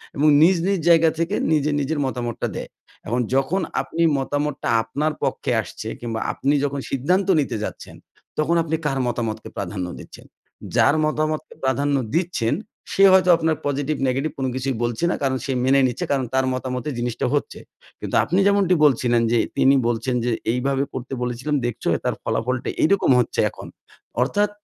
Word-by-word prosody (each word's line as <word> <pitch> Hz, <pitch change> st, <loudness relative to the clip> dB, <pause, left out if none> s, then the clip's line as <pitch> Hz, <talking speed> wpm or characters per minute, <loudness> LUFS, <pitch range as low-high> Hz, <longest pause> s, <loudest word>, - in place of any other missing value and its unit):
এবং 150 Hz, +2 st, +2 dB
নিজ, 180 Hz, +4 st, +6 dB
নিজ 195 Hz, -3 st, +1 dB
জায়গা 165 Hz, -1 st, +6 dB
থেকে 170 Hz, +5 st, 0 dB, 0.2 s
নিজে, 150 Hz, -1 st, +2 dB
নিজের 145 Hz, +2 st, -1 dB
মতামতটা 120 Hz, -3 st, -3 dB
দেয়। -, -, -6 dB, 0.4 s
এখন 120 Hz, +3 st, 0 dB
যখন 145 Hz, +8 st, +1 dB, 0.2 s
আপনি 170 Hz, -, -4 dB, 0.2 s
মতামতটা 145 Hz, +1 st, -2 dB
আপনার 150 Hz, +7 st, -2 dB
পক্ষে -, -, -1 dB
আসছে -, -, -9 dB
কিংবা 115 Hz, -2 st, -4 dB
আপনি 140 Hz, +2 st, 0 dB
যখন 140 Hz, -1 st, -1 dB
সিদ্ধান্ত 180 Hz, +9 st, +1 dB
নিতে 140 Hz, -, -1 dB
যাচ্ছেন -, -, -7 dB, 0.4 s
তখন 155 Hz, +3 st, +1 dB
আপনি 160 Hz, 0 st, -1 dB
কার 135 Hz, -2 st, 0 dB
মতামতকে 110 Hz, -2 st, -3 dB
প্রাধান্য 95 Hz, -2 st, -3 dB
দিচ্ছেন? -, -, -13 dB, 0.5 s
যার 145 Hz, -, +4 dB
মতামতকে 155 Hz, 0 st, -2 dB
প্রাধান্য 140 Hz, +2 st, +1 dB, 0.2 s
দিচ্ছেন, 165 Hz, -10 st, 0 dB, 0.4 s
সে 195 Hz, -, +4 dB
হয়তো 185 Hz, -1 st, +5 dB
আপনার 160 Hz, -1 st, +1 dB
পজিটিভ 145 Hz, +1 st, -1 dB
নেগেটিভ 135 Hz, +5 st, -1 dB
কোনো 130 Hz, -1 st, -1 dB
কিছুই 130 Hz, 0 st, -2 dB
বলছে 120 Hz, +6 st, -2 dB
না -, -, 0 dB
কারণ 130 Hz, -1 st, +1 dB
সে 135 Hz, -, -2 dB
মেনে 135 Hz, +2 st, +4 dB
নিচ্ছে 125 Hz, -, -3 dB
কারণ 135 Hz, -2 st, +1 dB
তার 130 Hz, 0 st, +2 dB
মতামতে 130 Hz, +2 st, -3 dB
জিনিসটা 120 Hz, -1 st, -2 dB
হচ্ছে। -, -, -2 dB, 0.4 s
কিন্তু -, -, -4 dB
আপনি 185 Hz, +4 st, 0 dB
যেমনটি 200 Hz, -3 st, +3 dB
বলছিলেন 120 Hz, -4 st, +3 dB
যে, 120 Hz, -, +3 dB, 0.2 s
তিনি 135 Hz, +1 st, +5 dB
বলছেন 120 Hz, +2 st, -1 dB
যে 125 Hz, -, +1 dB, 0.2 s
এইভাবে 135 Hz, +2 st, 0 dB
করতে 130 Hz, +1 st, -6 dB
বলেছিলাম 125 Hz, +5 st, -2 dB
দেখছো 120 Hz, -, -4 dB, 0.2 s
তার -, -, 0 dB
ফলাফলটা 125 Hz, +2 st, -1 dB
এইরকম 190 Hz, -4 st, +3 dB
হচ্ছে 120 Hz, -, -1 dB
এখন -, -, -11 dB, 0.5 s
অর্থাৎ 205 Hz, +10 st, +1 dB
135 Hz, 165 wpm, -22 LUFS, 125-155 Hz, 0.5 s, নিজ